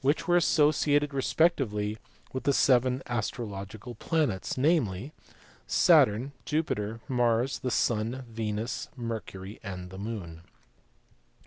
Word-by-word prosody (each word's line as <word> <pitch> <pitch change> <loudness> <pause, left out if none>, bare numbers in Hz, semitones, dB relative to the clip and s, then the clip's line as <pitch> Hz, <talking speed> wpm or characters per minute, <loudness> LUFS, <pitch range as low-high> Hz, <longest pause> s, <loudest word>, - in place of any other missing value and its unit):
were 175 - +3
associated 150 -3 +3
respectively 130 -8 +1 0.4
with 130 - -3
the 140 - +3
seven 130 0 +3
astrological 110 -1 -4
"planets:" 130 - -1
namely, 135 - +1 0.5
Saturn, 105 - +4
Jupiter, 115 -8 -2
Mars, 120 0 +1
the 130 - -2
Sun, 120 +2 0
Venus, 110 0 -3
Mercury, 110 -4 -6
and 90 -3 -7
the 95 - -8
Moon. 100 -7 -6
115 Hz, 100 wpm, -28 LUFS, 105-135 Hz, 0.5 s, Saturn